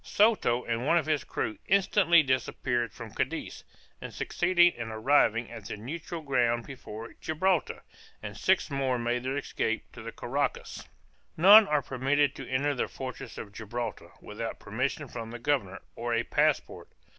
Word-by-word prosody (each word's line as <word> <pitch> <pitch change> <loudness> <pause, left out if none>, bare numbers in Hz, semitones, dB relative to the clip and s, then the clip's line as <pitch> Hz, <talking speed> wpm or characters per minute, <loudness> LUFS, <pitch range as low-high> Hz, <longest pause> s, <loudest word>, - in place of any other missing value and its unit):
Soto 200 - +2
and 120 +3 -2
one 170 - +4
of 165 - +1
his 155 -3 0
crew 110 - -4
instantly 185 -3 +4
disappeared 125 -3 -1
from 115 -2 -10
Cadiz, 160 +8 -3 0.4
and - - -7
succeeded 175 0 +3
in 120 -2 -6
arriving 115 0 +2
at 110 -4 -9
the - - -5
neutral 155 +8 -6
ground 120 -4 +1
before 115 -4 -9
Gibraltar, 165 +1 0 0.4
and 105 -1 -6
six 185 - +1
more 135 -2 0
made 120 +1 -1
their 130 +2 -2
escape 115 -5 -2
to - - -11
the 115 +1 -7
Carraccas. 140 +5 -3 0.5
None 200 +5 +9
are 150 -2 +1
permitted 135 +2 +1
to - - -9
enter 140 +3 +1
the 125 - -1
fortress 130 -1 -8
of 100 - -7
Gibraltar, 110 -1 -5
without 115 +2 -6
permission 130 +7 -3
from 115 -2 -7
the 120 - -7
governor, 120 -7 -1
or 120 0 -2
a 115 - +1
passport. - - 0
130 Hz, 160 wpm, -28 LUFS, 115-150 Hz, 0.5 s, None